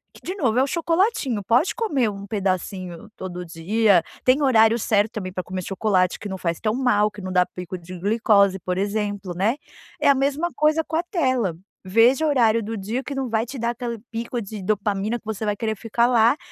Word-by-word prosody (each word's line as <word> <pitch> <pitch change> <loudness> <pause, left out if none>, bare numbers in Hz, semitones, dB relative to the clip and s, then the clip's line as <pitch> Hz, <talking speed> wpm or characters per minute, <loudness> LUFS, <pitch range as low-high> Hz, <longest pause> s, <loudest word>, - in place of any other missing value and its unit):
que - - -15
de 365 - -4
novo 250 - 0
é 260 - +5
o - - 0
chocolatinho, 330 - 0
pode 245 - +2
comer 285 - +1
um 200 -1 -7
pedacinho 185 -3 -3
todo 180 -1 -6
dia, 185 +3 +2 0.2
tem 260 +3 +3
horário 230 -3 +4
certo 210 0 +1
também 185 -4 -5
para 185 -1 -3
comer 185 0 -5
chocolate 190 -1 +1
que 205 - -7
não 190 - -4
faz 170 -2 -2
tão 215 -1 0
mal 215 -5 +2
que 210 -1 -10
não 185 0 -5
dá 180 -1 +3
pico 180 0 -7
de 175 +1 -10
glicose, 200 -1 +3
por 180 +1 -3
exemplo, 205 -2 -2
né. 215 +9 +1 0.4
É - - +4
a 280 - +6
mesma 285 +5 0
coisa 305 +1 +2
com 320 - -5
a 335 - +1
tela. 260 - 0 0.3
Veja 235 +9 +4
o 310 - +2
horário 230 -5 +3
do 220 +1 -4
dia 220 +7 -3
que 280 - -5
não 270 -2 -2
vai 225 +1 0
te 260 +1 -8
dar 235 +1 0
aquele 235 -2 -5
pico 235 +1 -4
de 205 -1 -7
dopamina 210 +2 -1
que - - -37
você 220 0 -4
vai 210 - +1
querer 220 +1 -2
ficar 235 +3 +1
lá, 240 +3 +4
220 Hz, 220 wpm, -23 LUFS, 195-250 Hz, 0.4 s, a